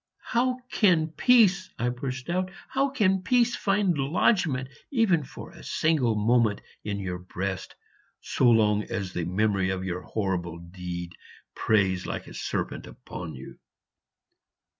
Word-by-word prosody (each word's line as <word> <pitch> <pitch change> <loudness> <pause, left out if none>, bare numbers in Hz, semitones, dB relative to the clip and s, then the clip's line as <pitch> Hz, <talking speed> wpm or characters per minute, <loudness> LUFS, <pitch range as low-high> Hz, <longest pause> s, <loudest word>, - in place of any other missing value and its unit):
"How 250 +2 +2
can 170 -7 +3
peace," 195 -1 +4
I 120 - 0
burst 125 +1 -5
out 185 +2 0 0.2
"how 270 +1 +1
can 195 -8 +2
peace 245 +2 +3
find 195 -3 +1
lodgment 140 - +1 0.2
even 215 - +3
for - - -10
a - - -14
single 145 -8 +1
moment 110 0 +3 0.2
in 105 -1 -3
your 90 -2 -4
breast, 95 +1 -5 0.4
so 125 - +2
long 105 -2 +4
as 95 -2 -4
the 85 - -2
memory 95 +1 +1
of 95 0 -2
your 90 0 -3
horrible 90 -5 -2
deed 85 0 -6 0.4
preys 95 -4 +1
like - - -4
a - - -11
serpent - - -3
upon 80 -4 -8
you?" 65 - -11
120 Hz, 140 wpm, -27 LUFS, -, 0.4 s, peace